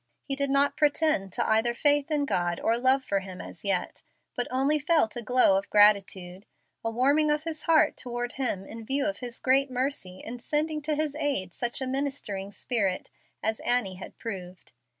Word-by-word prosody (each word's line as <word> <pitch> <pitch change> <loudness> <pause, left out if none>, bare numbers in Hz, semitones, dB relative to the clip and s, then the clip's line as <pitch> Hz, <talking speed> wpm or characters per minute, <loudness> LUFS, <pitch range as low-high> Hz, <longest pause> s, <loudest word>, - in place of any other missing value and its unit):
He 275 - -2
did 280 0 0
not 280 +1 +2
pretend 295 -9 +2
to - - -1
either 225 +2 +2
faith 290 +3 +2
in 295 -2 +1
God 175 -8 -1
or 230 - +1
love 260 +2 +3
for 200 - 0
Him 185 -1 -9
as 165 - -9
yet, 195 -3 -1 0.3
but 245 - -1
only 275 +4 +1
felt 295 -6 +2
a 240 - -3
glow 235 -4 +4
of 195 - -11
gratitude, 200 -2 +3 0.4
a 225 - 0
warming 280 +6 +2
of 300 0 +1
his 320 -2 -5
heart 320 -1 +3
toward 245 -1 -4
Him 240 -8 -2
in 225 +3 -9
view 275 +5 -1
of 300 - -2
His 245 -2 -7
great 270 +1 +2
mercy 250 -8 -3
in 245 +2 -7
sending 305 +4 -1
to 300 +1 -1
his 300 -1 -1
aid 195 - -1
such 240 +2 -2
a - - -1
ministering 260 -8 -3
spirit 200 -3 -1 0.3
as 220 0 0
Annie 205 -7 0
had 185 - -10
proved. 185 - -8
245 Hz, 190 wpm, -27 LUFS, 200-285 Hz, 0.4 s, glow